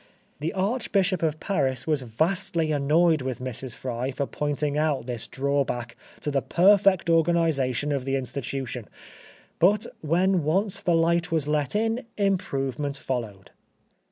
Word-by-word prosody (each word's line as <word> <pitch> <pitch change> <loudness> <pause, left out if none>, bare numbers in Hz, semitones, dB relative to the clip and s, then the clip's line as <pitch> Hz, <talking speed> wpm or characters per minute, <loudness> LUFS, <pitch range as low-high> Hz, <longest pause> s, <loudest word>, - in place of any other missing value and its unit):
The 155 +3 -2
Archbishop 195 -2 0
of 155 -1 0
Paris 135 -11 0
was 150 -3 +1
vastly 160 - 0
annoyed 155 +2 +3
with 130 -1 -3
Mrs. 130 -1 -5
Fry 125 0 -3
for 140 +1 -2
pointing 145 0 -2
out 150 -5 0
this 120 -3 -3
drawback 135 -4 -1 0.3
to 150 - -2
the 140 -1 +1
perfect 195 +2 +4
organisation 160 -5 +2
of 140 -3 -1
the 135 +1 -1
institution; 130 -2 -4 0.7
but 205 +4 +4 0.2
when 175 +3 +2
once 190 +6 0
the 175 - +2
light 170 +1 +2
was 160 -3 +1
let 150 +2 0
in, 225 +3 +1 0.2
improvement 145 - -1
followed. 110 -8 -5
150 Hz, 135 wpm, -26 LUFS, 135-175 Hz, 0.7 s, perfect